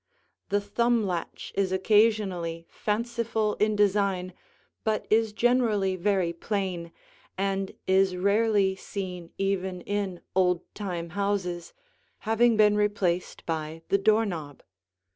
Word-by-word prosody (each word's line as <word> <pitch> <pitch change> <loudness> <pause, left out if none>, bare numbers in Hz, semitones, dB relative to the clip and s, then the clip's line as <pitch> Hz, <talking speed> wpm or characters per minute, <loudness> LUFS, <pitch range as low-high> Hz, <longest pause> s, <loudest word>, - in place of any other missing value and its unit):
The 205 - +2
thumb 235 +2 +1
latch 175 -3 -4
is 195 -2 0
occasionally 190 -4 +2
fanciful 225 0 -1
in 215 0 +2
design 200 -3 +1 0.5
but 220 -1 0
is 220 0 +3
generally 220 -4 +2
very 185 -2 +1
plain 180 -2 -3 0.5
and 195 0 -1
is 190 0 +3
rarely 200 0 +2
seen 180 -3 -6
even 190 -2 -1
in 200 -3 -3
old 180 -2 +3
time 175 -5 -4
houses, 185 -3 -2 0.5
having 225 +1 +3
been 210 -1 +5
replaced 205 -4 0
by 160 0 -4
the 200 - +3
door 215 +3 +4
knob. 155 -8 -6
195 Hz, 115 wpm, -27 LUFS, 180-210 Hz, 0.5 s, been